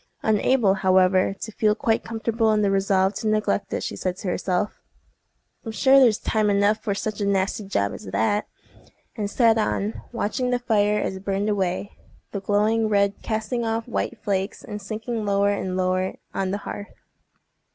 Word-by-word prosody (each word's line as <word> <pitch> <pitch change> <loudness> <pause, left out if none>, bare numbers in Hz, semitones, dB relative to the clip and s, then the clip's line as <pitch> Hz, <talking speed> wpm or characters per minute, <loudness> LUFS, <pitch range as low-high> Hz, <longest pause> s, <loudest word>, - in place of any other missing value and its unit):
Unable, 220 0 +3
however, 185 0 +3
to 220 - -5
feel 210 0 +2
quite 225 0 0
comfortable 225 0 0
in 210 0 +2
the 200 - +2
resolve 195 0 +2
to 215 - -3
neglect 215 -1 0
it, - - -2
she - - -4
said 185 -1 -3
to 195 - -4
herself, 185 +2 -1 0.8
"I'm 225 - -5
sure 265 +6 +5
there's 235 -5 +5
time 215 -1 0
enough 205 +1 +3
for 200 - -2
such 215 +1 -3
a - - +1
nasty 195 +1 0
job 100 - -1
as - - -9
that!" 110 - 0 0.7
and 210 -3 -2
sat 225 0 +3
on, 210 0 -1
watching 245 +2 -1
the 250 - +2
fire 210 -3 +2
as 190 - -2
it 190 - -12
burned 200 +1 -1
away, 195 -1 -2 0.3
the 200 - -3
glowing 215 +2 +2
red 200 -1 +1
casting 220 +2 -2
off 225 0 -2
white 240 0 -2
flakes, 195 0 -2
and 210 -3 -7
sinking 220 +3 -4
lower 200 0 +2
and 190 -2 -2
lower 185 0 0 0.2
on 195 -1 -1
the 200 - -1
hearth. 205 - -7
205 Hz, 180 wpm, -24 LUFS, 195-220 Hz, 0.8 s, sure